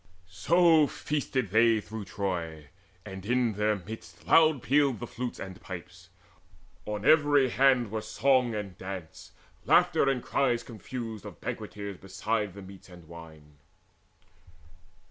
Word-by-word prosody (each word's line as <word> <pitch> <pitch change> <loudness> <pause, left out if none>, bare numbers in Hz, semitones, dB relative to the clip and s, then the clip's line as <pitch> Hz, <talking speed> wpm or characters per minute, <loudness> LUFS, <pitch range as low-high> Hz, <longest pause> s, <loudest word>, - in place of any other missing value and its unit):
So 160 - +4
feasted 135 -9 -3
they 115 +1 +4
through 105 0 -7
Troy, 85 -7 -4 0.4
and 95 -2 -8
in 120 +1 +1
their 105 +1 +1
midst 90 -3 -10
Loud 155 -5 +4
pealed 140 -2 +2
the 120 - -5
flutes 120 +1 -5
and 95 +1 -8
pipes: 90 -1 -10 0.8
on 105 -1 -4
every 145 -3 +5
hand 125 -3 +3
Were 110 0 -2
song 130 -1 +1
and 100 -3 -5
dance, 95 -4 -8 0.3
laughter 175 -5 +4
and 125 -3 -1
cries 125 -4 0
confused 115 0 -7
Of - - -10
banqueters 100 -2 -6
beside 100 +1 -3
the 100 - -9
meats 95 0 -13
and 90 -3 -14
wine. 80 -3 -13
105 Hz, 130 wpm, -28 LUFS, 95-130 Hz, 0.8 s, every